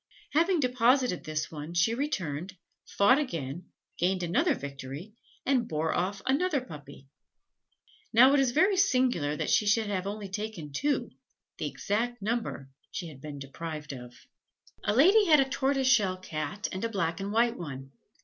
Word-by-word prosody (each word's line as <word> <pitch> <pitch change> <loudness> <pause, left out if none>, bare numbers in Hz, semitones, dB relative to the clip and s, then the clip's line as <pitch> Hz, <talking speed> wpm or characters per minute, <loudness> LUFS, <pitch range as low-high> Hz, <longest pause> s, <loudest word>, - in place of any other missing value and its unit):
Having 335 +2 +3
deposited 250 -4 +2
this 155 0 -3
one, 155 +2 -7
she 180 +7 +3
returned, 190 - -3 0.4
fought 255 +8 +6
again, 170 - -4 0.3
gained 180 +1 +1
another 275 - +2
victory, 140 +7 -8 0.3
and 255 -4 +2
bore 155 +1 -1
off 195 +2 -2
another 290 +3 +2
puppy. 145 - -11 1.0
Now, 255 +4 +7
it 285 - +4
is 270 -2 +3
very 375 +10 +3
singular 255 - +2
that - - -2
she 210 - +3
should 220 +2 +3
have 190 -1 -2
only 205 0 -5
taken 195 -7 -6
two, 285 - 0 0.5
the - - -1
exact 240 +4 -2
number 210 - -3 0.2
she 175 -3 -5
had 135 -4 -13
been 150 -1 -7
deprived 150 +2 -6
of. 125 -2 -10 0.7
A 205 - +1
lady 390 - +6
had 310 -4 +6
a 270 - +3
tortoiseshell 265 -8 +2
Cat 185 +4 -4
and 185 - -5
a 230 - 0
black 170 -5 -1
and 195 +1 -4
white 230 +2 +2
one. 135 - -7
205 Hz, 160 wpm, -29 LUFS, 155-255 Hz, 1.0 s, Now